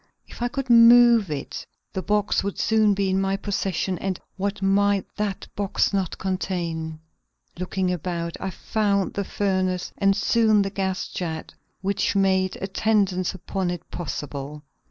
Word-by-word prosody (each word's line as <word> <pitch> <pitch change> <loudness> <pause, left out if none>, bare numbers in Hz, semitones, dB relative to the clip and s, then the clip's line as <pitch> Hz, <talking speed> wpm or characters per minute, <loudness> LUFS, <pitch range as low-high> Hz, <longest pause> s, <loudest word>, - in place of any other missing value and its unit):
If - - -12
I 240 - +2
could 270 -1 -3
move 235 -3 +7
it 145 -3 -5 0.3
the 190 - -2
box 205 +1 +1
would 200 0 -3
soon 215 -2 +3
be 195 -1 0
in 190 +1 +2
my 195 0 0
possession 190 -3 -2
and 190 -2 -2 0.2
what 200 +2 -2
might 200 0 +3
that 205 -2 -3
box 200 0 0
not 190 -3 -1
contain! 170 -4 -3 0.6
Looking 185 0 -1
about, 170 -1 -3
I 190 - -3
found 200 +1 0
the 200 - -1
furnace 185 -2 -1
and 195 -1 +4
soon 215 -1 +3
the 195 - -3
gas 190 -2 -2
jet 160 -3 -5 0.3
which 200 +1 0
made 190 -1 +2
attendance 195 -2 +1
upon 190 0 -3
it 175 -1 -6
possible. 145 -3 -5
195 Hz, 150 wpm, -24 LUFS, 180-205 Hz, 0.6 s, move